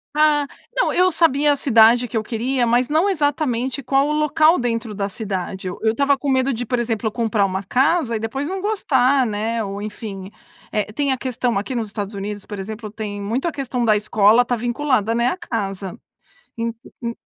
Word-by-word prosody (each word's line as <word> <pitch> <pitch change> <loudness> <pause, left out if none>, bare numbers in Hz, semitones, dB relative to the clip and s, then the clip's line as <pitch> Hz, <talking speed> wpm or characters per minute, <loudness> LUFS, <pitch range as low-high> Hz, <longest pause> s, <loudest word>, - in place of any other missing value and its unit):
Ah, 300 -1 +4 0.3
não, - - +2
eu 365 +1 +4
sabia 295 -4 +3
a - - -1
cidade 235 -2 +5
que 225 -1 -4
eu 215 - 0
queria, 240 +2 -1
mas 245 +2 +2
não 325 +7 +2
exatamente 280 -6 0
qual 275 +3 +2
o - - 0
local 305 +2 +3
dentro 230 -2 -2
da 200 0 -2
cidade. 190 -2 -5
Eu 180 - -6
eu 220 0 +3
estava 280 +2 +2
com 285 - -5
medo 260 0 +2
de, 240 +2 -3
por 245 +1 -1
exemplo, 225 -2 -1
comprar 220 -3 0
uma 190 +1 -3
casa 265 - +1
e - - -5
depois 265 +6 -3
não 385 0 -3
gostar, 275 - +2
né? 220 +1 -2
Ou 200 0 -5
enfim, 205 -2 -7 0.4
eh 210 0 -1
tem 275 +3 0
a - - -3
questão 245 -3 -1
aqui 205 +6 -3
nos 225 -2 -2
Estados 205 0 -5
Unidos, 205 0 -5
por 205 -2 -7
exemplo, 215 +1 -6
tem 205 -2 -5
muito 235 +10 -2
a 330 - -2
questão 250 -3 -2
da 215 -1 +4
escola 215 +2 +4
está 245 0 -1
vinculada, 240 -2 0
né? 235 +1 +2
A 360 - -1
casa, 195 - -4 0.6
en 230 0 -2 0.3
en 235 0 -3
235 Hz, 205 wpm, -21 LUFS, 215-275 Hz, 0.6 s, cidade